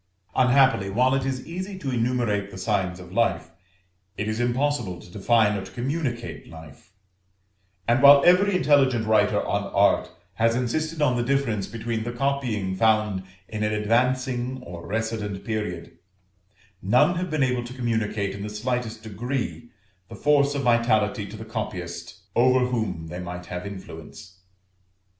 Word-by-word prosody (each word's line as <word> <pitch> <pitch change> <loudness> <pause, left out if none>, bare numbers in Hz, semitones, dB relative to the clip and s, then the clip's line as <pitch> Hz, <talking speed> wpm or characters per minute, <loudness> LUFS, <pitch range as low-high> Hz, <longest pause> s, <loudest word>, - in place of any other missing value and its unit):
Unhappily, 130 -5 +4
while 125 +6 +2
it 135 0 0
is 130 -1 -3
easy 185 +3 -6
to 140 -7 -4
enumerate 115 -4 0
the 95 - -10
signs 95 -2 -1
of 90 0 -11
life, 115 -7 0 0.7
it 105 - -2
is 110 +1 -2
impossible 120 -6 0
to 90 - -14
define 105 +1 +2
or 100 - -3
to 95 - -11
communicate 125 -2 -3
life; 80 +1 -13 1.0
and 120 +2 +3
while 140 0 +9
every 185 +3 +5
intelligent 135 -9 +3
writer 105 -1 +2
on - - -1
Art - - +3 0.3
has 115 +1 +3
insisted 155 +6 -1
on 125 -4 +2
the 120 - +1
difference 120 -6 0
between 115 -1 -3
the 120 - -4
copying 120 -8 -1
found 110 -2 +2 0.3
in 110 -1 -5
an 105 0 +1
advancing 125 +3 0
or 85 -4 -9
recedent 110 -2 -3
period, 105 -6 -4 0.8
none 125 - +4
have 180 +1 -2
been 155 -2 +1
able 125 -2 0
to 120 +1 -8
communicate, 110 -5 -1
in 100 - -7
the 105 - -4
slightest 115 0 -3
degree, 120 +3 -4 0.4
the - - -8
force 145 -1 +3
of 140 - -1
vitality 115 -3 +2
to 105 +2 -9
the 110 - -8
copyist 90 -5 -6
over 125 +1 +4
whom 110 -9 -2
they 90 +2 -7
might 90 0 -6
have 90 +2 -6
influence. 95 0 -10
115 Hz, 155 wpm, -25 LUFS, 100-130 Hz, 1.0 s, while